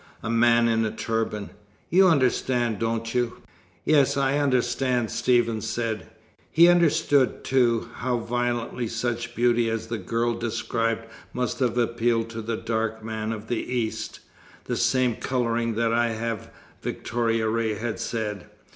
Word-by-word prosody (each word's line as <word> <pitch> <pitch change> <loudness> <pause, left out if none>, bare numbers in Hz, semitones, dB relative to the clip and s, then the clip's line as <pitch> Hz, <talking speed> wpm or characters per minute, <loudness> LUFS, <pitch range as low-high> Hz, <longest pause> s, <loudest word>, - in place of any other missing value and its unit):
A 110 - -2
man 115 0 +4
in 115 -1 +2
a 110 - 0
turban! 110 -2 -3 0.4
You 190 +3 +6
understand, 125 - +2
don't 115 0 -2
you?" 120 -1 -1 0.4
"Yes, 145 -3 +4
I 140 +1 +2
understand," 125 -3 +1
Stephen 120 -3 +2
said. 115 0 -3 0.4
He 170 +2 +6
understood, 160 -6 +3
too, 120 -4 +2
how 125 0 0
violently 120 0 -2
such 120 +1 -3
beauty 120 -1 +3
as 115 0 -3
the 115 -1 -2
girl 115 +5 0
described 115 0 -2 0.3
must 125 -2 -2
have 125 -2 +1
appealed 115 -1 +1
to 115 0 -5
the 115 +1 -3
dark 110 -1 -2
man 110 0 -3
of 110 0 -6
the 120 - -1
East. 120 -3 -3 0.4
"The - - -3
same 125 -3 +2
colouring 115 -3 -1
that 115 0 +1
I 120 0 +3
have," 115 -1 -4 0.3
Victoria 115 -1 -1
Ray 110 -1 0
had 110 +1 -4
said. 110 -4 -3
115 Hz, 145 wpm, -25 LUFS, 115-125 Hz, 0.4 s, You